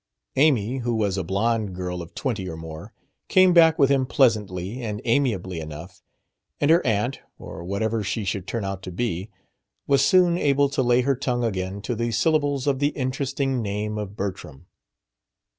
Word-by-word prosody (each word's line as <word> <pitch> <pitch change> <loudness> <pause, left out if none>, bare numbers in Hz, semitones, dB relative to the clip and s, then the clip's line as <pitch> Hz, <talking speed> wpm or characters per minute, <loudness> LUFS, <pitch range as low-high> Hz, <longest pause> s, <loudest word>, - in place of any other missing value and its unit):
Amy 130 -4 +2
who 120 -1 -1
was 105 -3 0
a 95 - -2
blonde 100 +2 -1
girl 90 -1 -4
of 85 - -11
twenty 105 -8 -3
or 80 - -6
more 80 -1 -9 0.4
came 185 -1 +5
back 165 -1 +6
with 140 -3 +4
him 135 -2 +2
pleasantly 110 -4 +1
and 105 -3 -4
amiably 110 -9 0
enough; 80 +4 -9 0.6
and 145 +2 +3
her 170 +2 +5
aunt 115 +2 0 0.2
or 80 - -9
whatever 110 +5 -1
she 100 +2 -2
should 95 0 -3
turn 115 -4 -3
out 95 -1 -4
to 90 - -7
be 95 0 -3 0.6
was 140 -1 +3
soon 175 +3 +4
able 140 0 +3
to 135 - 0
lay 120 0 +3
her 135 +2 +1
tongue 120 -1 -1
again 95 -2 -3
to 120 - -2
the 115 +1 -1
syllables 145 +2 +1
of 140 -2 +1
the 145 +1 +2
interesting 135 0 -1
name 105 +1 -3
of 105 -1 -6
Bertram. 95 -8 -6
115 Hz, 175 wpm, -24 LUFS, 95-135 Hz, 0.6 s, back